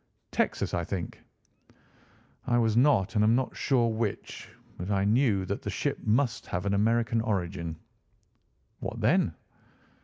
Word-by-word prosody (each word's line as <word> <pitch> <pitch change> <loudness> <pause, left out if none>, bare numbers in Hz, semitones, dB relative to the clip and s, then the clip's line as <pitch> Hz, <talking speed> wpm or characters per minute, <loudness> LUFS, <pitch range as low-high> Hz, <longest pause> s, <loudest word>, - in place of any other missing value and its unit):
"Texas, - - 0
I 85 - 0
think." 90 0 -5 1.3
"I 120 - +3
was 115 -2 +2
not 120 -6 +3
and 105 -2 +3
am 110 +2 +4
not 130 0 -1
sure 125 -4 +2
which; 110 -2 -3 0.3
but 90 +3 -4
I 100 -1 +1
knew 105 -3 +2
that - - -3
the - - -4
ship - - -2
must 120 +2 +1
have 90 +2 -3
an 100 - +1
American 115 +2 +2
origin." 90 -6 -2 1.0
"What - - -5
then?" - - +2
110 Hz, 145 wpm, -28 LUFS, 95-120 Hz, 1.3 s, am